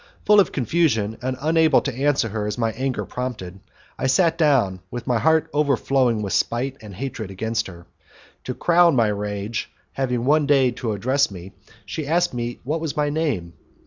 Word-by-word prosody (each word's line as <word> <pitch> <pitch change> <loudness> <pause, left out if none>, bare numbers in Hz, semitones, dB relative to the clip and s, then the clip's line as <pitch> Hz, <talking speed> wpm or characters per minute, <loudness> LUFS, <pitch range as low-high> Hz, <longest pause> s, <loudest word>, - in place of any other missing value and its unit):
Full 210 0 +6
of 200 - +3
confusion, 120 -6 0
and 130 +1 -2
unable 160 +2 +4
to 140 - -3
answer 135 -2 +1
her 105 0 -3
as 105 - -3
my 115 -2 0
anger 130 +3 -3
prompted, 110 -8 -5 0.4
I - - 0
sat 165 +5 +3
down, 135 - +2
with 120 0 -6
my 120 -2 +1
heart 160 +6 +3
overflowing 135 -5 +1
with 100 - -3
spite 130 +3 0
and 105 -3 -10
hatred 115 -3 -5
against 110 +4 -2
her. 85 -2 -12 0.6
To - - -4
crown 170 -2 +4
my 115 -3 +3
rage, 105 +1 -3 0.2
having 125 -3 -2
one 150 +1 +3
day 135 -3 +4
to 115 -2 -3
address 130 +7 +1
me, 95 -1 -10 0.3
she 145 +8 -5
asked 175 +1 +1
me 120 0 -4
what 155 +5 -2
was 160 -3 -4
my 145 -1 +1
name. 135 - -2
125 Hz, 180 wpm, -22 LUFS, 110-145 Hz, 0.6 s, Full